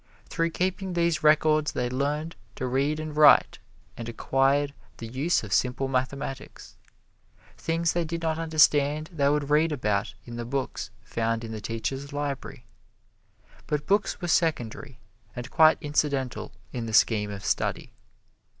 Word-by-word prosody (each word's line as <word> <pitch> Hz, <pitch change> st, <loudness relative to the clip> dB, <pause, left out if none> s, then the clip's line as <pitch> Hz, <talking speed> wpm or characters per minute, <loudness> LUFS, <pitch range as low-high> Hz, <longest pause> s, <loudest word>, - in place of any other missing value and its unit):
Through 165 Hz, -1 st, 0 dB
keeping 185 Hz, +2 st, -2 dB
these 170 Hz, -2 st, +1 dB
records 155 Hz, 0 st, +3 dB
they 125 Hz, -, -1 dB
learned 145 Hz, +5 st, -2 dB, 0.2 s
to 130 Hz, -, -3 dB
read 140 Hz, +4 st, 0 dB
and 155 Hz, -1 st, -5 dB
write 150 Hz, -1 st, +6 dB, 0.4 s
and 115 Hz, 0 st, -6 dB
acquired 135 Hz, +4 st, +1 dB, 0.2 s
the 115 Hz, -, -7 dB
use 130 Hz, +8 st, 0 dB
of 100 Hz, -3 st, -4 dB
simple 130 Hz, +1 st, +1 dB
mathematics. 135 Hz, +1 st, -4 dB, 0.8 s
Things 165 Hz, 0 st, 0 dB
they 175 Hz, -, 0 dB
did 165 Hz, +1 st, -4 dB
not 160 Hz, 0 st, 0 dB
understand 155 Hz, -1 st, +3 dB
they 140 Hz, -3 st, +2 dB
would 145 Hz, 0 st, 0 dB
read 155 Hz, +2 st, +4 dB
about 110 Hz, -6 st, -1 dB
in 120 Hz, -1 st, -8 dB
the 120 Hz, -, -3 dB
books 135 Hz, +1 st, -3 dB
found 115 Hz, 0 st, -2 dB
in 115 Hz, -, -6 dB
the 110 Hz, -1 st, -6 dB
teacher's 135 Hz, +6 st, -4 dB
library. 145 Hz, -1 st, -5 dB, 1.0 s
But 150 Hz, 0 st, -1 dB
books 200 Hz, +1 st, +1 dB
were 175 Hz, -, -4 dB
secondary 155 Hz, -9 st, 0 dB, 0.4 s
and 120 Hz, 0 st, -7 dB
quite 160 Hz, -1 st, +6 dB
incidental 140 Hz, -3 st, -1 dB, 0.2 s
in 120 Hz, -3 st, -4 dB
the 110 Hz, -, -5 dB
scheme 105 Hz, +1 st, +3 dB
of 100 Hz, -1 st, -7 dB
study. -, -, -1 dB
145 Hz, 150 wpm, -26 LUFS, 125-155 Hz, 1.0 s, write